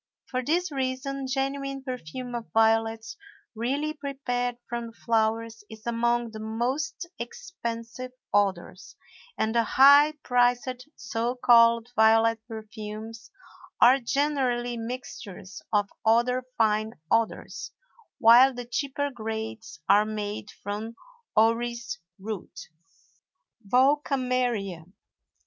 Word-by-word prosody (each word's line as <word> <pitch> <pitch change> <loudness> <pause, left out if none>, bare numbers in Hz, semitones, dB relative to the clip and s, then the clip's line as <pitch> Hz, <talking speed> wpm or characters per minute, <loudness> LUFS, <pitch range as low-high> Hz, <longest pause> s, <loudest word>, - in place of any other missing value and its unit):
For 255 0 -3
this 340 +5 0
reason 270 0 -3
genuine 275 0 -2
perfume 250 - -6
of 235 -1 -5
violets, 225 0 +2 0.4
really 275 +7 -1
prepared 255 -4 -3
from 235 -1 -4
the 230 - -12
flowers, 225 -1 -1
is 220 -1 -12
among 235 0 0
the 220 - -8
most 250 +10 -2
expensive 240 - -6 0.2
odors, 195 -2 -1 0.4
and 220 0 0
the 235 - +4
high 285 +6 +6
priced 245 +1 +1
so 230 +2 -2
called 230 -1 +5
violet 225 +1 +4
perfumes 220 0 -8 0.5
are 255 +3 +7
generally 250 -2 0
mixtures 220 -5 -7
of 205 -1 +2 0.2
other 240 +3 +2
fine 215 0 +2 0.2
odors, 225 -1 -1 0.5
while 245 +3 +7
the 245 0 -6
cheaper 280 +3 -2
grades 220 - -6
are 205 +2 +6
made 210 -1 -4
from 210 +3 -6 0.4
orris 235 +1 +1 0.2
root. 190 -3 -7 1.0
VOLKAMERIA. 250 - +1
235 Hz, 100 wpm, -27 LUFS, 220-255 Hz, 1.0 s, are